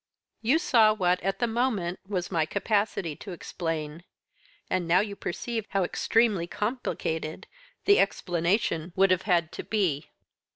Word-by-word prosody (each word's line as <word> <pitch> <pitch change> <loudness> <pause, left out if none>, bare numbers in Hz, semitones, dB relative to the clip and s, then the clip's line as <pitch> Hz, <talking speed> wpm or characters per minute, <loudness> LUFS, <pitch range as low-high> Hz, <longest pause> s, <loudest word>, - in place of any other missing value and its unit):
"You 245 +8 +3
saw 230 -10 +4
what, 180 -3 +1
at 195 +2 -1
the 240 - +1
moment, 225 -7 -1
was 185 -3 -3
my 160 -3 +1
capacity 200 -5 0
to 195 - -8
explain, 165 -2 -4 0.6
and 180 -2 -1
now 175 +2 +5
you 205 -1 -4
perceive 225 +4 -4
how 195 -1 +1
extremely 210 -1 +2
complicated 175 -8 -3 0.4
the 405 0 +6
explanation 175 -2 0
would 195 0 +4
have 185 -1 +3
had 170 -2 +3
to - - -6
be." 175 -9 -1
190 Hz, 140 wpm, -27 LUFS, 170-215 Hz, 0.6 s, the